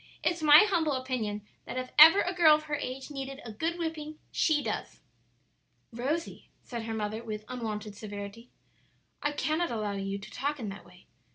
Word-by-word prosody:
"It's 345 -2 0
my 305 +4 +8
humble 325 -7 +1
opinion 245 -6 -3 0.2
that - - -6
if 255 0 -4
ever 325 +6 +10
a 360 - -1
girl 330 -4 +7
of 305 - -4
her 305 -1 -7
age 270 0 -4
needed 275 -1 -6
a 225 - -6
good 325 +11 -2
whipping, 315 -2 -4
she 305 -3 +2
does." - - -4 0.9
"Rosie," 285 +8 -3
said 235 -2 -6
her 225 - -3
mother, 215 +1 -3
with 215 -2 -6
unwonted 215 -4 -5
severity, 205 +3 -8 0.7
"I 290 - 0
cannot 310 +3 0
allow 215 -3 -2
you 195 0 -3
to 200 - -11
talk 285 +3 -2
in 220 -4 -4
that 195 +1 -9
way. - - -18
255 Hz, 180 wpm, -29 LUFS, 215-310 Hz, 0.9 s, ever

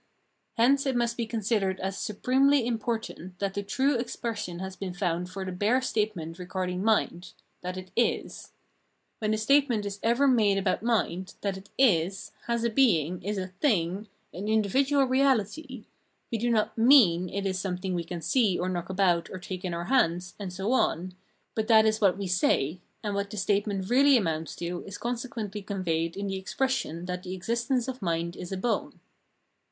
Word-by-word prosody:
Hence 275 +4 +4
it 265 - +1
must 235 -1 +1
be 235 -2 -3
considered 210 -4 0
as 190 +1 -3
supremely 260 +6 +2
important 225 -6 -3
that 200 0 -2
the 200 - -2
true 260 +7 +1
expression 225 -6 -4
has 190 +1 -6
been 185 -2 -5
found 180 -1 -1
for 190 +1 -5
the 185 - -4
bare 205 +8 +2
statement 210 -9 -2
regarding 180 0 -3
mind 205 -5 0
— - - -44
that 180 +1 -5
it 185 0 -8
is. 235 0 -1 0.7
When 215 - -1
the 215 - +1
statement 240 -2 +3
is 200 0 -5
ever 240 +5 +3
made 215 -6 +4
about 195 - 0
mind, 210 -6 -1
that 200 -2 -1
it 190 +1 -11
is, 190 -7 +2 0.2
has 235 -1 0
a 235 - +1
being, 180 - +2
is 205 +3 -3
a 185 -1 -3
thing, 190 - 0 0.3
an 190 +5 -5
individual 265 +7 +3
reahty, 260 -1 0 0.5
we 230 - -1
do 240 +2 0
not 220 -2 +1
mean 225 -8 +5
it 200 +2 -3
is 190 -1 -1
some 185 -2 -2
thing 185 0 -3
we 175 -1 -1
can 170 0 -6
see, 205 - +2
or 180 - -1
knock 175 -1 -3
about, 185 -3 +2
or 185 - -6
take 185 0 -7
in 185 - -2
our 170 0 -3
hands, 180 -8 +1
and 195 -3 -5
so 195 +5 -2
on, 185 -8 +1 0.4
but 220 -1 -2
that 220 -1 +6
is 220 0 +1
what 190 -3 +4
we 200 - -3
say, 175 -3 +1 0.2
and 205 -1 -2
what 200 0 -2
the 210 - -7
state 205 +1 +1
ment 195 -2 -2
really 270 +3 +5
amounts 165 -6 -2
to 175 +1 -4
is 195 - -7
consequently 230 -4 -4
conveyed 175 -4 -2
in 200 - -3
the 195 -1 -2
expression 215 -4 -2
that 180 0 -4
the 185 0 -5
existence 235 +6 -1
of 260 -2 -5
mind 170 -1 -1
is 180 - -8
a 190 - -2
bone. 225 +4 -2
200 Hz, 190 wpm, -28 LUFS, 180-235 Hz, 0.7 s, that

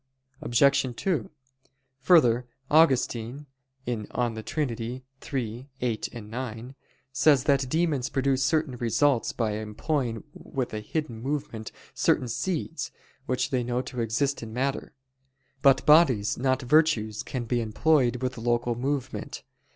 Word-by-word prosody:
Obj. 130 0 +3
2: 190 +5 -1 0.7
Further, 125 -6 +4 0.2
Augustine 135 -3 +2 0.4
(De 115 0 -2
Trin. 120 -4 -3 0.2
iii, 125 0 -4
8, 120 -1 -3
9) 120 +2 -6 0.4
says 135 0 +4
that 140 -3 +2
demons 155 -4 0
produce 135 -1 +1
certain 155 -2 +1
results 120 +2 +2
by 115 -3 -1
employing 115 +2 -2
with 130 -4 -5
a 110 - -2
hidden 115 0 -4
movement 135 -5 -4 0.2
certain 125 - +2
seeds, 165 +6 -3 0.4
which 130 - -1
they 125 -2 +1
know 120 +1 -1
to 125 -1 -5
exist 135 +5 0
in 115 -1 -7
matter. 135 +4 -2 0.7
But 135 -2 +4
bodies, 135 -9 +5
not 130 +1 0
virtues, 125 -7 +2
can 125 -3 -4
be 120 +1 0
employed 125 +2 +2
with 125 -2 -2
local 120 +1 0
movement. 135 +2 -3
125 Hz, 120 wpm, -27 LUFS, 115-140 Hz, 0.7 s, bodies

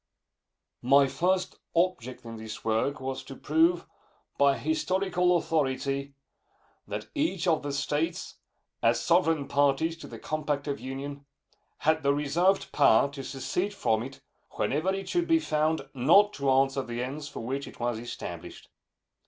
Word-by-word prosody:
My 140 +3 +5
first 185 +7 0 0.2
object 130 -8 0
in 115 -1 -7
this 110 -1 -8
work 115 +6 0
was 130 0 -4
to 135 - -9
prove, 165 +5 +2 0.5
by 140 -1 +4
historical 185 - +1
authority, 140 -3 -1 0.7
that - - -5
each 290 - -1
of 160 -2 +3
the 145 - -4
States, 150 +4 -2 0.4
as 115 +1 +3
sovereign 165 -4 +2
parties 145 +3 +2
to - - -10
the - - -9
compact 150 -2 -2
of 140 -1 -2
Union, 140 +2 -6 0.6
had 160 +1 +3
the 140 -1 +2
reserved 170 +7 +1
power 140 -1 +4
to 140 -1 -7
secede 180 +10 -3
from 110 - +1
it 135 +3 -8 0.3
whenever 155 +7 0
it 195 0 -4
should 345 -1 0
be 330 - +5
found 155 - 0
not 170 +11 +5
to 140 -1 -1
answer 135 0 +3
the 120 -1 -4
ends 145 +3 -5
for - - -7
which 135 +4 -3
it - - -12
was 120 -2 -1
established. 120 +1 -8
145 Hz, 150 wpm, -28 LUFS, 135-170 Hz, 0.7 s, My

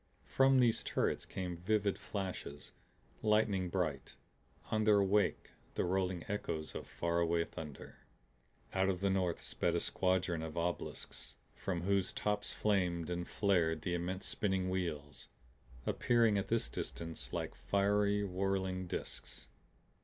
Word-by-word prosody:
From 135 0 +5
these 120 -3 +4
turrets - - 0
came 90 -2 -4
vivid 100 +2 +1
flashes, 95 -7 -5 0.5
lightning 105 -4 +3
bright 80 -7 -2 0.6
on 110 0 +2
their 105 -2 +6
wake 100 +1 +2 0.2
the - - +1
rolling 90 -1 0
echoes 85 -6 -3
of - - -6
faraway 85 0 +1
thunder. 75 -3 -9 0.7
Out 95 0 +3
of 90 -1 -1
the 100 -1 +2
north 90 -3 +1
sped - - 0
a - - +3
squadron 90 -3 +1
of 80 0 -5
obelisks 85 +1 -3 0.2
from 90 -3 -2
whose 95 0 +1
tops 105 0 -1
flamed 90 -5 +1
and 90 0 -2
flared 85 -6 +2
the 90 - -1
immense 90 +2 -2
spinning 95 -2 0
wheels, 75 -6 -3 0.6
appearing 115 -3 +3
at 95 - -3
this 115 0 +1
distance 80 -1 -5
like - - -2
fiery 100 +1 +2
whirling 95 -1 -1
disks. - - -5
95 Hz, 130 wpm, -35 LUFS, 85-100 Hz, 0.7 s, their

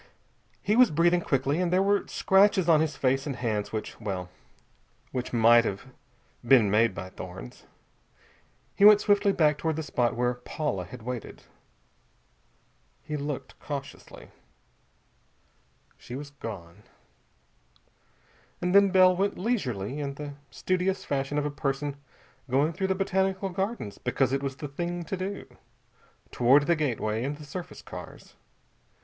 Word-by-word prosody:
He 210 - +2
was 250 0 +6
breathing 170 +3 +3
quickly, 140 +3 0
and 175 -1 0
there 185 +1 +3
were 200 +1 +1
scratches 190 -2 +3
on 160 -2 +5
his 155 -2 -1
face 135 +1 0
and 140 - -3
hands 110 -4 -2
which 110 +1 -5
well, 95 -4 -4 0.8
which 125 -1 -4
might 115 0 +6
have 100 0 -4 0.6
been 120 -5 +5
made 110 -1 +3
by 95 - -6
thorns. 90 -12 -10 1.1
He - - +1
went 210 0 +9
swiftly 205 -1 +3
back 150 -5 +2
toward 160 0 -1
the 160 - -3
spot 120 -5 0
where 125 +1 +1
Paula 125 - -4
had 125 +4 -11
waited. 125 -2 -6 1.6
He 150 0 -4
looked 145 -1 -5
cautiously. 140 -2 -8 1.7
She 120 - -9
was 140 +1 -7
gone. 100 -9 -9 1.8
And 180 0 -1
then 200 0 +6
Bell 185 -1 +5
went 195 +2 0
leisurely, 140 - -2
in 140 -1 -4
the 145 0 -7 0.2
studious 185 +1 -1
fashion 140 +1 -2
of 150 - 0
a 150 - -2
person 140 0 -2 0.5
going 140 +6 +2
through 190 +3 -1
the 190 - +1
Botanical 190 0 0
Gardens 190 - -4
because 130 +1 0
it 135 - 0
was 135 -1 -3
the 145 - -6
thing 175 +5 -4
to 170 - -4
do, 190 +2 -5 0.9
toward 135 +4 +4
the 170 - +3
gateway 115 -7 -1
and 145 +2 -3
the 150 - -11
surface 170 +5 -8
cars. - - -10
145 Hz, 145 wpm, -27 LUFS, 125-180 Hz, 1.8 s, went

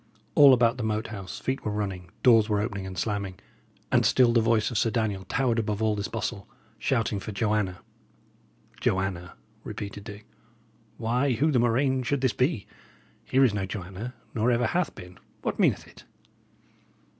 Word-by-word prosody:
All 145 -2 +8
about 120 -1 +4
the 120 - -3
Moat 110 0 -1
House 95 -3 -7
feet 130 +1 -3
were - - -2
running, 95 -4 -4
doors 115 -3 +6
were 105 -1 +2
opening 100 -3 -3
and 95 -1 -8
slamming, 100 -1 -2 0.5
and - - +4
still 125 -2 +4
the 115 - +4
voice 110 0 +2
of 115 - 0
Sir 115 - +2
Daniel 105 -5 -1
towered 120 -3 +1
above 105 -2 -2
all 110 -1 +1
this 100 0 -3
bustle, 105 -3 -4 0.3
shouting 115 -4 0
for 110 - -6
"Joanna." 105 -3 -1 1.0
"Joanna!" 95 -2 -1 0.3
repeated 100 0 -6
Dick. 105 -1 -9 0.7
"Why, 125 +4 +1
who 150 +7 +2
the 130 - +3
murrain 130 +3 +2
should 130 +2 -1
this 130 -3 +2
be? 130 - 0 0.6
Here 135 +1 +3
is 115 - +2
no 100 -2 -2
Joanna, 100 +6 -6 0.2
nor 115 +2 +1
ever 120 0 +2
hath 175 +10 0
been. 90 -2 -12 0.2
What - - -2
meaneth - - +2
it?" - - -16
110 Hz, 170 wpm, -27 LUFS, 100-125 Hz, 1.0 s, All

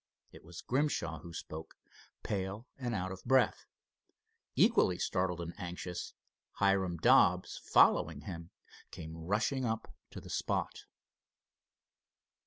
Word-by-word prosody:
It - - -14
was 85 +1 -10
Grimshaw 125 - 0
who 85 - -10
spoke, 80 -1 -8 0.5
pale 100 +3 -3
and 120 -4 -3
out 95 -1 -2
of 95 0 -8
breath. 130 -1 +3 0.9
Equally 90 - +4
startled 90 -1 0
and 85 0 -5
anxious, 90 -1 -5 0.4
Hiram 95 -3 +2
Dobbs, - - +4
following - - +4
him, 85 -3 -7 0.4
came 80 0 -8
rushing 105 +11 0
up 110 -2 -2 0.2
to - - -8
the - - -10
spot. - - -2
95 Hz, 115 wpm, -33 LUFS, 85-110 Hz, 0.9 s, Equally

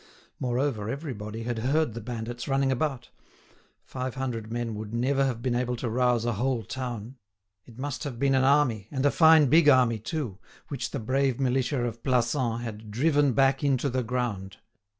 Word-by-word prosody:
Moreover 125 -4 -1
everybody 115 -6 -5
had 120 -1 -3
heard 135 +2 +1
the 115 - -6
bandits 120 +1 -5
running 135 -1 +1
about. 130 -1 -2 0.7
Five 130 -1 -5
hundred 120 -5 -4
men 120 -1 -2
would 105 +1 -6
never 135 +3 +1
have 120 -4 -2
been 125 - 0
able 125 0 -1
to 120 +1 -4
rouse 125 -1 +2
a 120 - 0
whole 120 +2 -1
town. 125 +1 -6 0.5
It 120 -2 -15
must 140 +3 -4
have 140 -6 -5
been 135 +2 +2
an 130 0 +3
army, 130 -7 +2
and 135 0 -2
a 145 - +5
fine 160 -2 +6
big 150 +3 +5
army 125 -4 +4
too, 115 - -4 0.3
which 130 -6 -3
the 140 - -4
brave 130 +2 0
militia 130 0 0
of 115 -1 -5
Plassans 120 -2 0
had 110 -2 -7
"driven 145 +4 +2
back 135 +3 +2
into 140 -1 +1
the 130 +1 0
ground." 115 -6 -3
125 Hz, 180 wpm, -27 LUFS, 115-135 Hz, 0.7 s, fine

